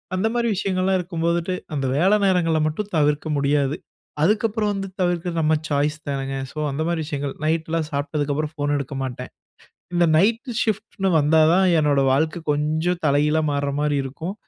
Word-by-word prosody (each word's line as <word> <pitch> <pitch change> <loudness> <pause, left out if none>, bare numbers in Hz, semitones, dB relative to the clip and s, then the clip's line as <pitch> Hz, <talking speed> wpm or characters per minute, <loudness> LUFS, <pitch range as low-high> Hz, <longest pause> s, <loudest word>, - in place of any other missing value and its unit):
அந்த 190 +4 +1
மாரி 235 -1 0
விஷயங்கள்லாம் 190 0 0
இருக்கும்போதுட்டு 170 0 -1 0.2
அந்த 135 -2 -1
வேல 190 +6 +4
நேரங்கள 175 -4 +2
மட்டும் 205 +7 -4
தவிர்க்க 150 +1 +1
முடியாது. 140 0 +1 0.5
அதுக்கப்புறம் 210 +2 +1
வந்து 195 0 -4
தவிர்க்றது 175 -1 -1
நம்ம 155 0 +2 0.2
சாய்ஸ் 150 +1 0
தானேங்க. 135 -1 -3 0.2
ஸோ, - - -15
அந்த 145 +3 -3
மாதிரி 170 -1 -1
விஷயங்கள் 145 -2 -3
நைட்லாம் 160 0 0
சாப்ட்டதுக்கப்புறம் 145 +1 -2
ஃபோன் 145 0 -1
எடுக்க 140 0 -5
மாட்டேன். 125 -1 -6 0.6
இந்த 175 0 +4
நைட்‌டு 230 - +1
ஷிஃப்ட்ன்னு 215 -3 -2
வந்தா 155 +2 +4
தான் 190 +1 +4
என்னோட 145 -2 +2
வாழ்க்கை 155 +4 0
கொஞ்சம் 155 +4 0
தல 140 - +3
கீழா 155 +1 +2
மாற 140 0 -1
மாரி 150 -1 +1
இருக்கும். 160 +8 -5
160 Hz, 160 wpm, -22 LUFS, 145-185 Hz, 0.6 s, வேல